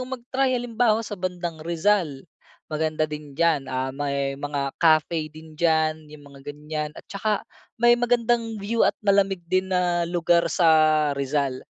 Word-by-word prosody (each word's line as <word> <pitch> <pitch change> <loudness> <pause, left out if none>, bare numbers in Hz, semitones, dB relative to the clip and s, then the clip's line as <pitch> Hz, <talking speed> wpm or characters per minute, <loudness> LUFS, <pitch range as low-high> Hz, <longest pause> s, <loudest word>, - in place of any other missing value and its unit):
mag 255 -1 -6
try 260 -1 +2
halimbawa 230 -2 +1
sa 215 - -8
bandang 180 -4 -4
Rizal. 170 -3 0 0.4
Maganda 155 0 -1
din 150 -2 -8
diyan, 160 -5 +1
ah, 130 0 -2
may 140 -1 -2
mga 140 -1 -3
cafe 155 -1 +3
din 155 +1 -14
diyan 155 -1 0
'yung 150 -1 -13
mga 140 -1 -15
ganiyan 150 +1 -5
at - - -11
tsaka, 205 +1 -2 0.3
may 240 +1 +5
magandang 240 -2 +1
view 215 +3 -3
at - - +3
malamig 195 -3 +2
din 185 +2 0
na 175 -2 0
lugar 170 -1 +2
sa 155 -3 +4
Rizal. 140 -1 -1
165 Hz, 155 wpm, -24 LUFS, 150-200 Hz, 0.4 s, may